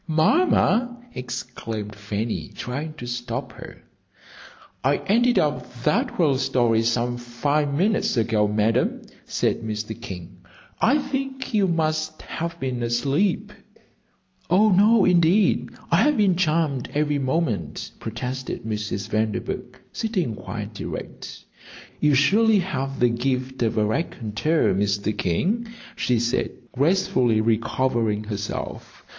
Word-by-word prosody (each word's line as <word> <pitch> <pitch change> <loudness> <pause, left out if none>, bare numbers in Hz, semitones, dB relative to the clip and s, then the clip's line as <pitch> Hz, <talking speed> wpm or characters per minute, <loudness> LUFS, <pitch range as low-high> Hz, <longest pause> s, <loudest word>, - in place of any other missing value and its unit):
"Mamma!" 240 - +3 0.2
exclaimed 120 -4 -5
Fanny, 105 +2 -3
trying 145 +5 -4
to 120 - -8
stop 120 +1 -4
her. - - -12 1.0
"I 140 +3 +3
ended 240 +4 +3
up 125 -5 0
that 150 - +1
whale 145 -7 +3
some 120 -2 +1
five 140 +5 0
minutes 190 - +1
ago, 110 -2 +2
Madam," 105 +2 +1 0.2
said - - 0
Mr. 110 0 -5
King. 90 -5 -8 0.4
"I 260 +6 +5
think 270 -2 -4
you 205 -3 +3
must 155 -2 -1
have 170 +1 -5
been 130 -2 -2
asleep." 135 - 0 1.0
"Oh, 205 +5 +5
no, 205 +2 +5
indeed, 180 +3 +3 0.2
I - - +5
have 295 -2 +3
been 200 -4 +4
charmed 155 -6 0
every 150 -1 +1
moment," 130 - -1
protested 125 +3 -4
Mrs. 105 -2 -3
Vanderburgh 110 +3 -2
sitting 195 - -1
quite 105 0 -6
erect. - - -7 0.5
"You 150 -2 +4
surely 210 +10 +4
have 135 -8 -2
the 125 - +4
gift 130 +2 -2
of 115 -1 +1
a 105 - +3
raconteur, 115 - 0
Mr. 100 +1 0
King," 200 - 0 0.3
she 125 - +1
said, 120 +2 0 0.2
gracefully 130 - +2
recovering 115 -1 +1
herself. 105 -1 -6
130 Hz, 115 wpm, -24 LUFS, 115-170 Hz, 1.0 s, I